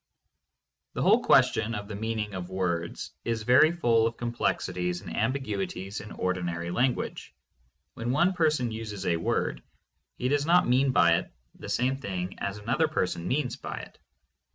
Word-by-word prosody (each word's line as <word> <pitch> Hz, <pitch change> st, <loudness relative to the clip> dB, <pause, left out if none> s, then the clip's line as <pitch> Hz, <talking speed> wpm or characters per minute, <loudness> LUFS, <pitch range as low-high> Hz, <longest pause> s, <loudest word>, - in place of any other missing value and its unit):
The -, -, -1 dB
whole -, -, +5 dB
question 115 Hz, +2 st, +4 dB
of 100 Hz, -1 st, -5 dB
the 105 Hz, -, -6 dB
meaning 110 Hz, -1 st, -3 dB
of 90 Hz, -1 st, -5 dB
words 85 Hz, -3 st, -2 dB
is 115 Hz, -2 st, -2 dB
very 125 Hz, +7 st, +6 dB
full 115 Hz, -9 st, +3 dB
of 115 Hz, -, -5 dB
complexities 90 Hz, -6 st, -1 dB
and -, -, -7 dB
ambiguities 105 Hz, -5 st, -2 dB
in 105 Hz, -, -10 dB
ordinary 85 Hz, -2 st, -2 dB
language. 125 Hz, +6 st, -1 dB, 0.6 s
When 115 Hz, +1 st, -4 dB
one 175 Hz, +9 st, +3 dB
person 155 Hz, -9 st, +1 dB
uses 110 Hz, -3 st, -5 dB
a 85 Hz, -, +2 dB
word, 70 Hz, -6 st, -1 dB, 0.6 s
he 125 Hz, -, -1 dB
does 145 Hz, +2 st, +1 dB
not 175 Hz, +1 st, +5 dB
mean 130 Hz, +3 st, +3 dB
by 85 Hz, -8 st, +5 dB
it -, -, -10 dB, 0.2 s
the -, -, -10 dB
same 125 Hz, +6 st, +1 dB
thing 95 Hz, -7 st, -5 dB
as 100 Hz, +1 st, -3 dB
another 115 Hz, +10 st, +1 dB
person 90 Hz, -, -2 dB
means 130 Hz, -1 st, -1 dB
by -, -, -6 dB
it. -, -, -10 dB
110 Hz, 160 wpm, -28 LUFS, 95-125 Hz, 0.6 s, very